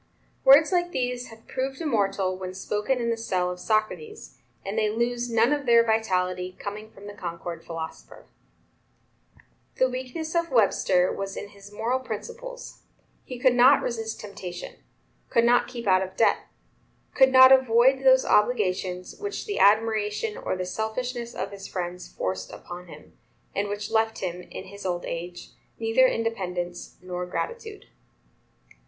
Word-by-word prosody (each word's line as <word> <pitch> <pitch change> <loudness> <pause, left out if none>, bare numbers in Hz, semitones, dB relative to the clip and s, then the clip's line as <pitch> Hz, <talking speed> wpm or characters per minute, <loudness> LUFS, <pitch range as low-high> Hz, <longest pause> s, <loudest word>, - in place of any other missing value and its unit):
Words 285 +5 +7
like 350 -1 +1
these 250 0 -2
have 225 0 -15
proved 265 +1 -3
immortal 200 - 0
when 185 0 -7
spoken 210 +6 -1
in 235 -1 -1
the 230 - -1
cell 180 -5 -1
of 180 - -7
Socrates, 220 - -2 0.3
and 195 +2 -4
they 215 -1 +2
lose 240 +2 -1
none 230 +4 +3
of 285 -2 -3
their 235 -1 +6
vitality, 185 -5 0
coming 210 +2 -7
from 200 -2 -15
the 205 - -8
Concord 170 -2 -6
philosopher. 160 - -8 1.5
The 260 - +3
weakness 260 +5 -5
of 335 -1 +1
Webster 195 -6 +3
was 195 0 -5
in 205 - -6
his 200 0 -15
moral 230 +5 -1
principles; 475 - -8 0.4
he 250 - -7
could 250 0 +4
not 255 +3 +6
resist 225 -2 -3
temptation; 185 -4 -8 0.5
could 230 - +3
not 240 +1 +4
keep 240 -1 -7
out 185 -2 +4
of 190 0 -5
debt; 225 - +2 0.7
could 265 -1 +5
not 260 0 +9
avoid 260 0 +5
those 260 -1 +6
obligations 185 -5 +1
which 410 0 -4
the 410 - -3
admiration 215 - +2
or 480 - -3
the 185 0 -3
selfishness 235 +5 -4
of - - -4
his 195 -1 -8
friends 180 0 -5
forced 95 0 -4
upon 180 0 -9
him, 160 - -14 0.4
and 200 +1 -1
which 205 +1 -4
left 220 0 +1
him, 180 -1 -4
in - - -7
his 200 +1 -11
old 175 -2 -2
age, 175 +1 -6 0.3
neither 225 +3 +4
independence 180 -7 -3
nor 180 -1 -4
gratitude. 445 - -5
220 Hz, 155 wpm, -26 LUFS, 185-255 Hz, 1.5 s, not